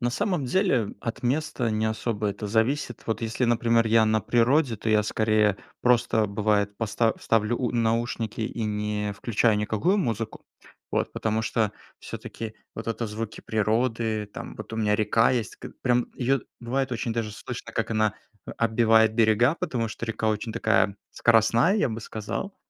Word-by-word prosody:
На 120 Hz, -, +1 dB
самом 150 Hz, -, -1 dB
деле, 125 Hz, -, +1 dB
от 115 Hz, +3 st, -5 dB
места 130 Hz, -2 st, 0 dB
не 110 Hz, 0 st, 0 dB
особо 110 Hz, -1 st, -1 dB
это 100 Hz, +1 st, -4 dB
зависит. 115 Hz, +4 st, 0 dB
Вот 110 Hz, -, -1 dB
если, 115 Hz, +2 st, -1 dB
например, 115 Hz, -1 st, +3 dB
я 115 Hz, 0 st, +5 dB
на 110 Hz, 0 st, +2 dB
природе, 120 Hz, +3 st, +2 dB
то 110 Hz, -, -4 dB
я 105 Hz, -1 st, +4 dB
скорее 105 Hz, -2 st, +2 dB, 0.2 s
просто, 120 Hz, -3 st, +3 dB
бывает, 105 Hz, 0 st, 0 dB
поста 115 Hz, 0 st, +1 dB
ставлю 115 Hz, +1 st, +1 dB
у 125 Hz, -, 0 dB
наушники 115 Hz, -1 st, -1 dB
и 110 Hz, +1 st, -2 dB
не 105 Hz, -1 st, -2 dB
включаю 110 Hz, +1 st, +1 dB
никакую 110 Hz, -, +1 dB
музыку. 115 Hz, -, -3 dB, 0.5 s
Вот. -, -, -1 dB
Потому 110 Hz, 0 st, -1 dB
что 110 Hz, -2 st, 0 dB, 0.3 s
всё-таки 110 Hz, -1 st, -7 dB, 0.2 s
вот 110 Hz, -, -7 dB
это 115 Hz, 0 st, -2 dB
звуки 105 Hz, +1 st, -6 dB
природы, 110 Hz, 0 st, 0 dB
там, -, -, -7 dB
вот -, -, -9 dB
у -, -, -3 dB
меня 105 Hz, -2 st, +2 dB
река 110 Hz, +3 st, +3 dB
есть. 120 Hz, -5 st, -2 dB
К -, -, -9 dB
прям, 125 Hz, -1 st, +2 dB
ее 135 Hz, +1 st, +1 dB, 0.2 s
бывает 130 Hz, +2 st, -1 dB
очень 120 Hz, -1 st, -2 dB
даже 110 Hz, -2 st, -2 dB
слышно, 105 Hz, -, -7 dB
как -, -, -2 dB
она 110 Hz, -1 st, +1 dB, 0.3 s
о -, -, -6 dB
отбивает 110 Hz, -1 st, +4 dB
берега, 115 Hz, +4 st, +4 dB
потому 125 Hz, -10 st, -2 dB
что 115 Hz, +1 st, -6 dB
река 110 Hz, 0 st, -1 dB
очень 110 Hz, +1 st, -2 dB
такая 110 Hz, -3 st, +2 dB
скоростная, 115 Hz, -, +4 dB
я 205 Hz, -, +2 dB
бы 110 Hz, +1 st, -4 dB
сказал. 110 Hz, -, -5 dB
115 Hz, 170 wpm, -26 LUFS, 110-120 Hz, 0.5 s, я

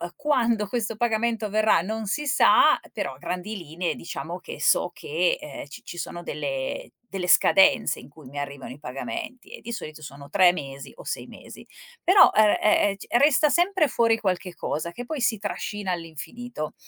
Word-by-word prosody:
quando 235 Hz, -8 st, +1 dB
questo 230 Hz, -2 st, -2 dB
pagamento 230 Hz, 0 st, 0 dB
avverrà 215 Hz, -4 st, +3 dB
non 220 Hz, +3 st, -4 dB
si 295 Hz, +9 st, -1 dB
sa; 285 Hz, -, +5 dB
però 135 Hz, -, -3 dB
a 130 Hz, -, -15 dB
grandi 180 Hz, +7 st, -4 dB
linee 170 Hz, -1 st, -3 dB
diciamo 170 Hz, +1 st, -6 dB
che -, -, -9 dB
so -, -, +3 dB
che, 475 Hz, +2 st, 0 dB
ehm, -, -, -8 dB
ci -, -, -11 dB
ci 175 Hz, -, -9 dB
sono 175 Hz, 0 st, -6 dB
delle 135 Hz, -3 st, -4 dB, 0.2 s
delle 185 Hz, -2 st, -3 dB
scadenze 190 Hz, +2 st, +5 dB
in 125 Hz, -, -13 dB
cui 145 Hz, -1 st, -15 dB
mi 140 Hz, +3 st, -7 dB
arrivano 140 Hz, -2 st, -6 dB
i 145 Hz, -, -15 dB
pagamenti 250 Hz, -, -6 dB
e -, -, -10 dB
di 235 Hz, -, -7 dB
solito 155 Hz, -9 st, -7 dB
sono 140 Hz, -1 st, -11 dB
3 185 Hz, -2 st, +6 dB
mesi 140 Hz, -5 st, -7 dB
o -, -, -12 dB
6 -, -, -4 dB
mesi. -, -, -12 dB, 0.4 s
Però, 380 Hz, +2 st, +7 dB
ehm 215 Hz, -1 st, +5 dB
ehm 210 Hz, -, +4 dB
ehm, 200 Hz, -, -3 dB
c 195 Hz, -, -11 dB
resta 295 Hz, +1 st, +5 dB
sempre 350 Hz, -2 st, +3 dB
fuori 230 Hz, -2 st, +2 dB
qualche 185 Hz, -3 st, -2 dB
cosa, 165 Hz, +3 st, -3 dB
che 245 Hz, +7 st, -7 dB
poi 300 Hz, 0 st, -4 dB
si 230 Hz, -3 st, +2 dB
trascina 205 Hz, -1 st, -4 dB
all'infinito. 165 Hz, +3 st, -6 dB
205 Hz, 185 wpm, -25 LUFS, 160-240 Hz, 0.4 s, Però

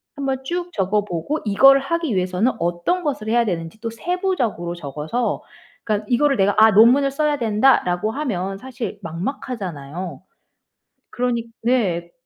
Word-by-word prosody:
한번 270 Hz, -2 st, -2 dB
쭉 350 Hz, +4 st, -3 dB
적어 205 Hz, +1 st, +1 dB
보고 210 Hz, -, -3 dB
이거를 270 Hz, +7 st, +6 dB
하기 320 Hz, -, -1 dB
위해서는 185 Hz, +6 st, +1 dB
어떤 175 Hz, -, 0 dB
것을 265 Hz, -8 st, -2 dB
해야 235 Hz, +1 st, +3 dB
되는지 170 Hz, +1 st, -4 dB
또 230 Hz, -, -3 dB
세부적으로 245 Hz, -, -2 dB
적어서 155 Hz, -, -3 dB, 0.4 s
그러니까 210 Hz, -1 st, -1 dB
이거를 275 Hz, +2 st, +3 dB
'내가 200 Hz, +1 st, +3 dB
아 220 Hz, +1 st, +8 dB
논문을 240 Hz, +7 st, +6 dB
써야 295 Hz, +1 st, 0 dB
된다.'라고 215 Hz, -4 st, +2 dB
하면 195 Hz, -9 st, -3 dB
사실 245 Hz, -4 st, -6 dB
막막하잖아요. 175 Hz, -, -5 dB, 0.9 s
그러니 245 Hz, -2 st, -1 dB, 0.2 s
네. 190 Hz, -9 st, 0 dB
225 Hz, 330 characters per minute, -21 LUFS, 180-270 Hz, 0.9 s, 아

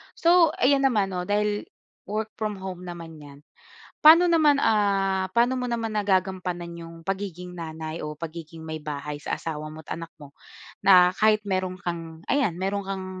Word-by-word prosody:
So 340 Hz, -2 st, +4 dB
ayan 275 Hz, +1 st, +4 dB
naman 210 Hz, -7 st, +2 dB
'no, 180 Hz, -1 st, -3 dB
dahil 210 Hz, 0 st, 0 dB, 0.4 s
work 215 Hz, +2 st, -3 dB
from 215 Hz, -1 st, -2 dB
home 180 Hz, -1 st, -6 dB
naman 165 Hz, -2 st, -8 dB
’yan, 145 Hz, -1 st, -13 dB, 0.6 s
pa'no 335 Hz, +3 st, +9 dB
naman, 300 Hz, -4 st, +4 dB
ah, 195 Hz, -3 st, +2 dB
paano 245 Hz, +2 st, +3 dB
mo 250 Hz, -, -2 dB
naman 235 Hz, -2 st, -2 dB
nagagampanan 185 Hz, -3 st, 0 dB
yung 165 Hz, 0 st, -10 dB
pagiging 180 Hz, -1 st, -5 dB
nanay 160 Hz, -1 st, -6 dB
o 150 Hz, -, -4 dB
pagiging 165 Hz, +1 st, -8 dB
maybahay 150 Hz, -2 st, -5 dB
sa 145 Hz, -, -4 dB
asawa 155 Hz, -1 st, -5 dB
mo 160 Hz, -, -9 dB
at 160 Hz, -, -6 dB
anak 165 Hz, 0 st, -8 dB
mo? 140 Hz, -1 st, -13 dB, 0.4 s
Na 180 Hz, -2 st, +6 dB
kahit 215 Hz, +2 st, +2 dB
meron 185 Hz, -2 st, -2 dB
kang 165 Hz, -2 st, -5 dB
ayan, 245 Hz, -12 st, +1 dB
meron 195 Hz, +2 st, -2 dB
kang 190 Hz, -1 st, -4 dB
185 Hz, 165 wpm, -25 LUFS, 165-210 Hz, 0.6 s, pa'no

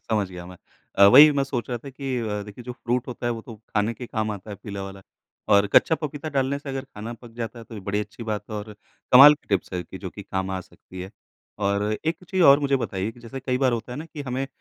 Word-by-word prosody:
समझ 105 Hz, -4 st, +1 dB
गया 90 Hz, -1 st, -8 dB
मैं। 90 Hz, 0 st, -11 dB, 0.4 s
अ, 100 Hz, -, +9 dB
वही 145 Hz, +8 st, +10 dB
मैं 140 Hz, -1 st, +1 dB
सोच 130 Hz, -3 st, -4 dB
रहा 120 Hz, -, -2 dB
था 140 Hz, -, -10 dB
कि 135 Hz, -1 st, -4 dB
अ, 105 Hz, -3 st, -2 dB
देखिए 105 Hz, +4 st, -10 dB
जो 125 Hz, -, -5 dB
फ़्रूट 120 Hz, 0 st, -2 dB
होता 120 Hz, -1 st, -5 dB
है 120 Hz, -, +1 dB
वो 115 Hz, -, -6 dB
तो 115 Hz, -, -10 dB
खाने 110 Hz, +1 st, -2 dB
के 125 Hz, +1 st, -8 dB
काम 110 Hz, -2 st, -2 dB
आता 105 Hz, 0 st, -7 dB
है 100 Hz, -, -6 dB
पीला 100 Hz, -2 st, -6 dB
वाला 95 Hz, 0 st, -9 dB, 0.5 s
और 100 Hz, 0 st, +5 dB
कच्चा 160 Hz, -, +6 dB
पपीता 150 Hz, 0 st, -5 dB
डालने 135 Hz, +1 st, +1 dB
से 145 Hz, 0 st, -10 dB
अगर 135 Hz, 0 st, -3 dB
खाना 115 Hz, -3 st, -8 dB
पक 120 Hz, 0 st, -13 dB
जाता 115 Hz, 0 st, -5 dB
है, 115 Hz, -, -10 dB
तो 115 Hz, -, -12 dB
ये 105 Hz, -, -7 dB
बड़ी 105 Hz, +1 st, +1 dB
अच्छी 105 Hz, +2 st, -8 dB
बात 105 Hz, -2 st, -3 dB
है -, -, -4 dB
और 105 Hz, +1 st, -6 dB, 0.4 s
कमाल 140 Hz, +4 st, +11 dB
की -, -, -25 dB
टिप्स 100 Hz, -2 st, -1 dB
है 90 Hz, -1 st, -2 dB
कि 95 Hz, +3 st, -10 dB
जो 95 Hz, -2 st, -6 dB
कि 100 Hz, -, -9 dB
काम 95 Hz, 0 st, -3 dB
आ 95 Hz, -1 st, -2 dB
सकती 90 Hz, 0 st, -13 dB
है। 95 Hz, +1 st, -7 dB, 0.5 s
और 100 Hz, 0 st, +1 dB, 0.2 s
एक 160 Hz, +1 st, 0 dB
चीज़ 185 Hz, +1 st, 0 dB
और 140 Hz, -3 st, +8 dB
मुझे 140 Hz, -1 st, +2 dB
बताइए 100 Hz, -5 st, -3 dB
कि 120 Hz, -, -17 dB
जैसे 120 Hz, +3 st, -8 dB
कई 125 Hz, -1 st, -1 dB
बार 130 Hz, -2 st, +3 dB
होता 120 Hz, +1 st, -3 dB
है 125 Hz, -, -6 dB
ना 155 Hz, -, -5 dB
कि 150 Hz, -3 st, -8 dB
हमें 130 Hz, +2 st, -2 dB
115 Hz, 280 wpm, -24 LUFS, 100-135 Hz, 0.5 s, कमाल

